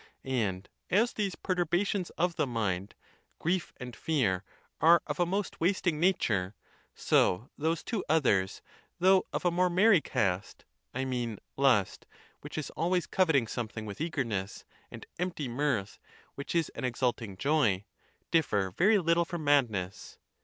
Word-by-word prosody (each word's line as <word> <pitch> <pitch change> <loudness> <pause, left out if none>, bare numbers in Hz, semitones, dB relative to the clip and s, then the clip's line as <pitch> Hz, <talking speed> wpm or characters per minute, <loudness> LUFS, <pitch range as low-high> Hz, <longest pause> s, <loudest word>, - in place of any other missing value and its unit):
And 105 -8 -1 0.2
as 225 +6 +3
these 200 -3 -2
perturbations 180 +1 0
of 175 0 +1
the - - 0
mind, 100 -5 -2 0.4
grief 175 +1 -1
and 125 -1 -8
fear, 110 - 0 0.4
are 170 +2 +7
of 150 +1 -4
a 175 - +3
most 195 0 -3
wasting 175 -3 +1
nature, 110 - +1 0.4
so 110 +9 +2
those 160 +2 -1
two 220 -6 -2
others, 105 -12 +2 0.3
though 185 +1 +4
of - - -3
a 175 - +4
more 180 +1 +2
merry 185 0 +5
cast 95 -5 -2 0.3
(I 130 +1 -2
mean 120 -4 -2 0.2
lust, 130 -8 +2 0.3
which - - -9
is 155 - -4
always 175 +1 0
coveting 160 -10 +2
something 110 -1 -5
with 105 +6 -7
eagerness, 120 - -3 0.2
and - - -10
empty 175 -6 -2
mirth, 120 -5 -1 0.3
which 140 +4 -6
is 165 -2 +2
an - - -8
exulting 120 -5 -1
joy), 115 -8 +2 0.5
differ 100 - +2
very 200 - +4
little 170 -2 +2
from 175 -2 -5
madness. 115 -11 0
145 Hz, 145 wpm, -30 LUFS, 110-175 Hz, 0.5 s, are